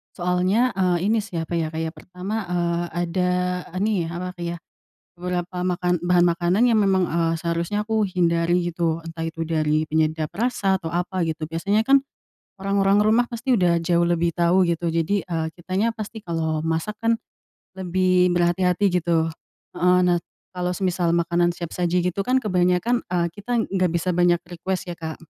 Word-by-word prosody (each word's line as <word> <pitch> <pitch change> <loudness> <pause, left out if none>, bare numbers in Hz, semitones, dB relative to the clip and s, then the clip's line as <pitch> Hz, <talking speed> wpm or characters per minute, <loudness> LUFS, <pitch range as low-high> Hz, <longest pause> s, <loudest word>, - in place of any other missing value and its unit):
soalnya, 185 +7 +1
eee, 180 +2 +2
ini 225 - +3
sih 205 -4 -7
apa 170 +1 -2
ya, 160 - 0
kayak 160 0 -3
pertama, 185 +4 -6
eee, 175 -1 0 0.2
ada 180 +1 0 0.5
nih 200 -6 0
apa 180 +2 -5
iya, 170 0 -3 0.6
beberapa 180 0 -4
makan 180 -1 0
bahan 175 0 +3
makanan 175 +5 +2
yang 215 - +4
memang, 190 -2 +3
eee, 165 0 0
seharusnya 170 +5 -2
aku 220 -1 0
hindari 175 -2 +1
gitu 165 -1 0
entah 165 0 -7
itu 165 0 -5
dari 155 -1 +1
penyedap 155 0 0
rasa 195 -3 0
atau 165 - -4
apa 180 +2 -2
gitu 160 -1 -2
biasanya 195 +7 0
kan, 275 0 +5 0.6
orang-orang 195 +1 +2
rumah 225 +4 +3
pasti 240 +2 0
udah 175 -4 +3
jauh 170 +1 +1
lebih 170 -1 +1
tahu 175 +2 +3
gitu 170 0 -1
jadi, 165 +5 0
eee, 165 -3 -2
kitanya 190 +6 -1
pasti 220 +1 -7
kalau 160 -4 -2
masak 165 +7 -2
kan, 230 0 +2 0.7
lebih 185 0 +2
berhati-hati 180 +2 +2
gitu, 165 -1 +1 0.4
heeh, 180 0 +3
nah 175 -1 +2 0.3
kalau 180 0 -2
semisal 175 -3 +1
makanan 170 0 +1
siap 170 -2 -6
saji 175 0 0
gitu 180 +2 -1
kan 255 +6 +1
kebanyakan, 180 +5 +2
eee, 170 -2 0
kita 240 +4 -3 0.2
gak 185 -2 +2
bisa 180 +2 0
banyak 175 0 +3
request 185 +2 -3
ya, 170 - -13
Kak, 160 -1 -5
180 Hz, 165 wpm, -23 LUFS, 170-190 Hz, 0.7 s, kan